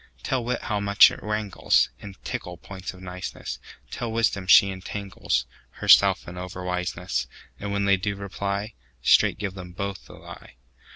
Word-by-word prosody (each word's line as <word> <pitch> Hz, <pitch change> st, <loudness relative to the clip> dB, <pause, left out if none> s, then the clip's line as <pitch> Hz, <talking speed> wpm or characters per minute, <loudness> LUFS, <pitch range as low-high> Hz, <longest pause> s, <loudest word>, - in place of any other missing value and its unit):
Tell 130 Hz, -2 st, -1 dB
wit 125 Hz, +1 st, -2 dB
how 105 Hz, -2 st, -1 dB
much 100 Hz, 0 st, +6 dB
it -, -, -8 dB
wranglesIn 105 Hz, -, 0 dB
tickle 90 Hz, 0 st, -5 dB
points 95 Hz, +2 st, -8 dB
of 95 Hz, -, -14 dB
niceness; 90 Hz, 0 st, -6 dB, 0.3 s
Tell 120 Hz, -2 st, -4 dB
wisdom 110 Hz, -4 st, 0 dB
she 100 Hz, +1 st, +7 dB
entanglesHerself 95 Hz, 0 st, +1 dB
in 90 Hz, +1 st, -7 dB
over 90 Hz, 0 st, -6 dB
wiseness:And 90 Hz, -1 st, -4 dB
when 100 Hz, 0 st, 0 dB
they 100 Hz, 0 st, +4 dB
do 100 Hz, +2 st, -2 dB
reply, 100 Hz, +1 st, -4 dB, 0.3 s
Straight -, -, +5 dB
give 100 Hz, -2 st, -4 dB
them 90 Hz, -2 st, -9 dB
both 100 Hz, +1 st, -5 dB
the -, -, -12 dB
lie. -, -, -12 dB
100 Hz, 150 wpm, -25 LUFS, 90-100 Hz, 0.3 s, she